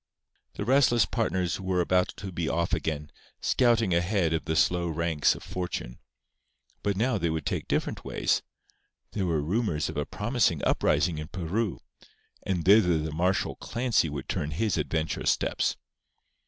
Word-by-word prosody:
The 100 - -4
restless 125 -2 +4
partners 95 -6 -1
were 95 -1 0
about 90 +1 +2
to 100 -1 -6
be 85 -2 -2
off 85 +1 -1
again, 80 -3 -2 0.3
scouting 115 -6 +2
ahead 85 -1 +1
of 80 - -1
the 80 - -1
slow 90 +1 +2
ranks 80 -2 +1
of - - -10
Fortune. 90 -9 -5 0.8
But 100 -2 -1
now 115 0 +1
they 85 -1 0
would 80 -2 -3
take - - -2
different - - -1
ways. - - 0 0.7
There 95 -3 -1
were 80 -3 0
rumours 85 -3 0
of - - -6
a - - 0
promising - - 0
uprising 85 -4 +2
in 75 - -5
Peru; 95 +4 -2 0.6
and 90 -4 -2
thither 95 -4 +6
the 80 0 -3
martial 90 +2 0
Clancy 115 -9 0
would 70 -2 -6
turn 75 - -2
his 100 +8 0
adventurous 80 0 -1
steps. - - 0
90 Hz, 155 wpm, -27 LUFS, 80-100 Hz, 0.8 s, thither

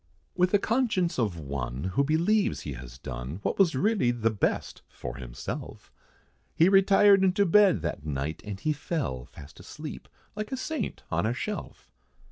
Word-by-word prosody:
With 180 0 +3
the 205 - +4
conscience 215 - 0
of 105 -7 0
one, 70 -3 -4
who 140 - +3
believes 170 +9 +2
he 70 - -5
has 60 -1 -10
done, 65 +4 -6
What - - -1
was 175 -7 +4
really 200 - +2
the 115 -2 +1
best, 105 - -1
for - - -7
himself, - - -7 0.6
He 170 +3 +5
retired 195 0 +6
into 190 +2 +3
bed, 190 - +5
that 80 -3 -3
night, 75 +1 -3
and 105 -2 -6
he 155 - 0
fell 145 - -3
Fast 70 +1 -14
asleep, - - -8 0.3
like 215 +3 -5
a 265 - -2
saint 315 +4 -4
on - - +1
a - - -1
shelf. - - -6
140 Hz, 165 wpm, -28 LUFS, -, 0.6 s, retired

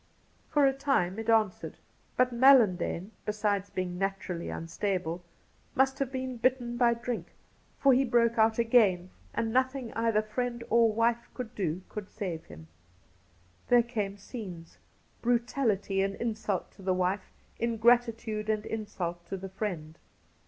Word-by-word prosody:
For 290 -2 +4
a 270 - +4
time 265 -9 0
it 225 - -4
answered, 220 -4 +1 0.4
but 250 0 +3
MaUandane, 225 -7 +4
besides 205 -2 -1
being 180 -2 -3
naturally 195 -3 -3
unstable, 175 0 -3 0.5
must 265 0 +2
have 270 -2 -1
been 260 -1 -4
bitten 240 0 +1
by 240 -1 +3
drink, 235 -7 -5 0.4
for 275 -1 +5
he 260 +2 +4
broke 235 -2 +2
out 220 0 +4
again, 210 -7 +3 0.2
and 225 -1 -2
nothing 260 -1 0
either 225 -2 +2
wife 240 0 -2
or 230 -2 +4
friend 235 0 +3 0.2
could 245 -2 -6
do 180 -3 -2
could 210 -2 -7
save 180 -7 -5
him. 80 0 -12 1.0
There 245 -1 +5
came 210 -4 -3
scenes 190 -6 -9 0.2
— - - -37
brutality 235 -5 +1
and 195 0 -1
insult 220 -5 -2
to - - -17
the 185 -1 +1
wife, 185 +2 -1 0.3
ingratitude 230 -2 +2
and 215 0 0
insult 185 -6 -4
to 195 - -4
the 190 +1 -7
friend. 175 -6 -5
220 Hz, 145 wpm, -29 LUFS, 190-240 Hz, 1.0 s, for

